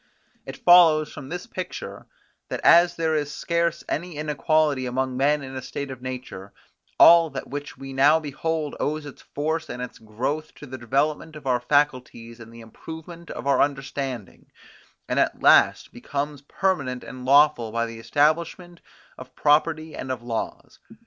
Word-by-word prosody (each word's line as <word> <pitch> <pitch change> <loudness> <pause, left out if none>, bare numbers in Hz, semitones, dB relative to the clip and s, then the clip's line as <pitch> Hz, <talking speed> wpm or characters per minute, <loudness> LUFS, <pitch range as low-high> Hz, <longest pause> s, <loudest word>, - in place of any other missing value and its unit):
It - - -7
follows 165 -4 +5
from 135 -1 -9
this 180 +3 -5
picture, 185 -1 -7 0.4
that - - -3
as 170 +1 +6
there 160 -1 0
is 145 -2 -1
scarce 170 0 -1
any 170 +1 -4
inequality 150 -2 0
among 130 +1 -2
men 145 +2 +1
in 130 0 -8
a 130 - -4
state 140 +2 -6
of 130 -2 -9
nature, 125 -7 -7 0.4
all 170 -1 +7
that 140 - -7
which 145 +1 -6
we 135 0 -8
now 145 +4 +5
behold 155 +1 -3
owes 155 0 -2
its 145 - -11
force 160 +2 -3
and 125 - -6
its 125 0 -7
growth 130 +8 -4
to - - -11
the 130 -1 -8
development 145 +6 -1
of 150 -2 -11
our 125 -2 +1
faculties 125 -3 -1
and 115 -1 -12
the 115 0 -12
improvement 160 +8 -11
of 120 - -7
our 140 - +3
understanding, 135 -6 -4 0.6
and - - 0
at - - 0
last - - +4
becomes 145 0 -4
permanent 140 -5 -2
and 130 0 -9
lawful 135 -4 +4
by 115 +1 -1
the 115 0 -8
establishment 165 +6 0 0.4
of 130 0 -12
property 155 +1 +1
and 130 - -5
of 125 -3 -5
laws. 115 -2 -5
145 Hz, 165 wpm, -24 LUFS, 130-155 Hz, 0.6 s, all